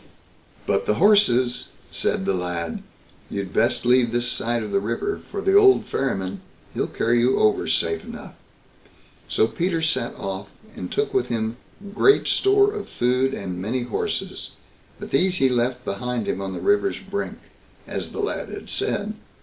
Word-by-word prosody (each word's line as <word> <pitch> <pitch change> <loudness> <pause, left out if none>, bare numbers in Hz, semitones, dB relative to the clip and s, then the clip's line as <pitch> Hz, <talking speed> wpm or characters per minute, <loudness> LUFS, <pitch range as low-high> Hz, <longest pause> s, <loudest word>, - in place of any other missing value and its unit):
"But - - 0
the 105 - +3
horses", 130 - +4 0.2
said 95 - 0
the 100 - +1
lad 90 -3 -3 0.5
"you'd 100 -2 -4
best 115 +2 +2
leave 125 -1 +4
this 120 +1 0
side 120 -1 -1
the 100 - +3
river; 115 - -2
for 400 - -4
the 390 - +3
old 400 -1 +6
ferryman, 95 -8 -2 0.3
he'll - - -1
carry 120 +1 +1
you 125 +2 +3
over 105 - +2
safe - - +1
enough." - - -9 1.0
So - - +3
Peter 170 +8 -1
set 160 -7 0
off, 95 +1 -5 0.3
and - - -6
took 425 0 -1
with 390 - +1
him 110 0 -2 0.4
great 405 - +4
store 405 +1 +4
of 425 - -6
food 125 +2 +1
and 90 -2 -5
many 120 +6 -1
horses; 120 - -3 0.5
but - - -8
these 180 +6 +3
he 135 -6 +3
left 125 +1 0
behind 120 +3 -3
him 95 - -1
on 95 -1 -4
the - - -5
river's 405 -1 +2
brink, 200 +1 -4 0.5
as - - -4
the - - -4
lad 415 - -2
had - - -8
said. 215 - -1
125 Hz, 165 wpm, -23 LUFS, -, 1.0 s, old